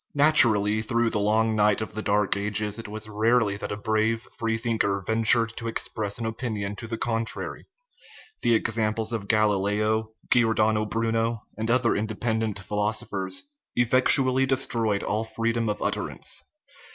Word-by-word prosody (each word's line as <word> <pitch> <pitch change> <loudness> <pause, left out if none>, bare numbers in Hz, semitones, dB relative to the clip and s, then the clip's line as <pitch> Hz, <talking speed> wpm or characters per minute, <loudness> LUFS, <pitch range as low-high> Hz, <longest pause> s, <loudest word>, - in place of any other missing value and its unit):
Naturally, 110 -8 +5
through 115 +1 0
the 105 - 0
long 110 +2 +2
night 105 -1 +3
of 110 - -5
the 110 - -4
Dark 105 -1 +1
Ages 105 +1 -1
it 115 - -7
was 110 +1 -6
rarely 110 0 +1
that - - -6
a 100 - -3
brave 110 +1 0
free 115 -1 -1
thinker 110 -4 -1
ventured 115 0 +4
to 115 - -4
ex 115 - -1
press 105 -2 -4
an 115 - -4
opinion 110 -3 -4
to 115 - -7
the 115 0 -4
contrary: 115 0 -3 0.7
the 120 - +3
examples 110 0 -1
of 105 -3 -4
Gal 110 -1 +3
ileo, 105 +3 0 0.2
Giordano 110 -2 +3
Bruno, 115 0 -1
and 110 +2 -4
other 120 0 +2
independent 110 0 -2
philos 105 +2 -1
ophers, 95 -4 -3 0.3
effectually 130 +2 +3
destroyed 115 -6 +1
all 110 +2 -1
freedom 115 0 -2
of 105 - -3
utterance. - - -3
110 Hz, 155 wpm, -25 LUFS, 105-115 Hz, 0.7 s, Naturally